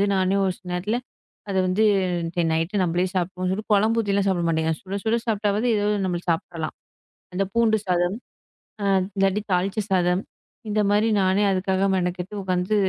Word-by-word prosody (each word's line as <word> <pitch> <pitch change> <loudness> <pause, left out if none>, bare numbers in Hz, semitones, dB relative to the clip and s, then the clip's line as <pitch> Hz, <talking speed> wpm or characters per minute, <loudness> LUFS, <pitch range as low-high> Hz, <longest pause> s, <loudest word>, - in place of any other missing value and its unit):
நானே 190 0 +2
ஒரு 185 - 0
சில 185 - -17
நேரத்துல 205 +7 -1 0.5
அத 195 - -1
வந்து, 185 +4 +2 0.4
"இன்னைக்கு 170 +1 -2
நைட் 165 +3 -1
நம்களே 175 +1 +1
சாப்பிடுவோம்." 185 0 -1
சொல்லிட்டு, 210 +4 -4
குழம்பு 220 +3 +3
ஊத்தி 205 -2 -2
எல்லாம் 200 0 +2
சாப்பிட 180 -3 +1
மாட்டேங்க. 160 0 +1
சுட 195 0 -6
சுட 225 +1 +2
சாப்பிட்டாவது, 210 0 0
ஏதாவது 210 0 +1
நம்ம 180 -2 -1
சாப்பிடலாம். 165 -1 -2 0.6
அந்தப் 195 +1 -1
பூண்டு 230 -2 +3
சாதம். 180 +1 +1 1.0
இல்லாட்டி 195 +1 +2
தாளிச்ச 190 +4 0
சாதம். 180 0 +2 0.5
இந்த 210 +1 0
மாரி 210 +2 +3
நானே 190 +2 +2
அதுக்காக 190 +1 +1
மெனக்கெட்டு 180 +1 -2
உக்காந்து 185 +2 0
190 Hz, 160 wpm, -24 LUFS, 180-205 Hz, 1.0 s, குழம்பு